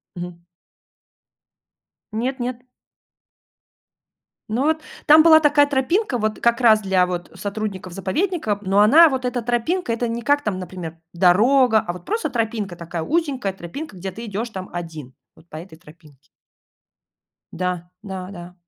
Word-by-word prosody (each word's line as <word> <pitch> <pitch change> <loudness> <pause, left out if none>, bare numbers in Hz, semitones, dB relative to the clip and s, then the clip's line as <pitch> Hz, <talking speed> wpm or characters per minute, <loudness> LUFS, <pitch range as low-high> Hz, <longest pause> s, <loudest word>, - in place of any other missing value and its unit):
Мгм. 175 -1 -7 1.7
Нет-нет. 250 +1 -3 1.9
Но 230 +5 0
вот, 315 +1 +1 0.3
там 310 +1 +8
была 315 -1 +8
такая 290 -1 +4
тропинка, 280 - 0
вот 215 -1 -2
как 235 0 +2
раз 220 -3 +5
для 190 -2 +2
вот 175 -1 -5
сотрудников 200 -3 -5
заповедника, 220 - -1
но 195 0 +1
она 315 +11 +8
вот 265 -3 -2
эта 250 0 -2
тропинка- 245 +4 -1
это 235 +1 -1
не 230 0 -4
как 285 +2 +2
там, 200 -4 -2
например, 175 -2 -7 0.2
дорога,- 220 +7 +4
а 175 - -2
вот 180 - -11
просто 440 - -2
тропинка, 220 -5 -2
такая 170 -1 -5
узенькая 275 - -1
тропинка, 195 - -8
где 190 +2 -6
ты 230 +5 -8
идешь 220 +3 -4
там 190 -4 -7
1 160 -7 -7 0.2
вот 165 - -21
по 155 - -8
этой 165 0 -11
тропинке. 150 -5 -19 1.3
Да, 180 -1 -3
да-да. 185 -3 -8
215 Hz, 140 wpm, -21 LUFS, 180-255 Hz, 1.9 s, там